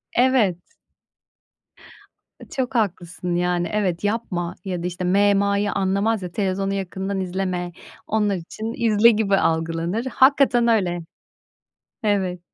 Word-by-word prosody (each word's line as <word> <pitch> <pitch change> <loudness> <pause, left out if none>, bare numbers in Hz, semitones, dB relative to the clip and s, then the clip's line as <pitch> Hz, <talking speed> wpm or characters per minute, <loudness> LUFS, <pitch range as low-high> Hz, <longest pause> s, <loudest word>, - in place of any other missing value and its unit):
Evet. 245 -8 +3 2.0
Çok 260 -1 -3
haklısın. 180 -4 -1
Yani, 175 0 0
evet 190 -4 -1
yapma 205 -5 -2
ya 180 -2 -3
da 180 - 0
işte 180 +1 -5
-me 200 +3 +4
-ma'yı 200 +1 +1
anlamaz 200 +2 0
ya. 175 - -5
"Televizyonu 195 0 -1
yakından 195 0 -3
izleme." 185 -1 -2 0.4
Onlar 210 -2 +1
için, 215 +6 -6
"İzle." 220 +1 +6
gibi 210 -3 +2
algılanır. 165 +7 -1
Hakikaten 260 -2 +4
öyle. 185 -6 +2 1.0
Evet. 190 -4 0
195 Hz, 115 wpm, -22 LUFS, 180-215 Hz, 2.0 s, İzle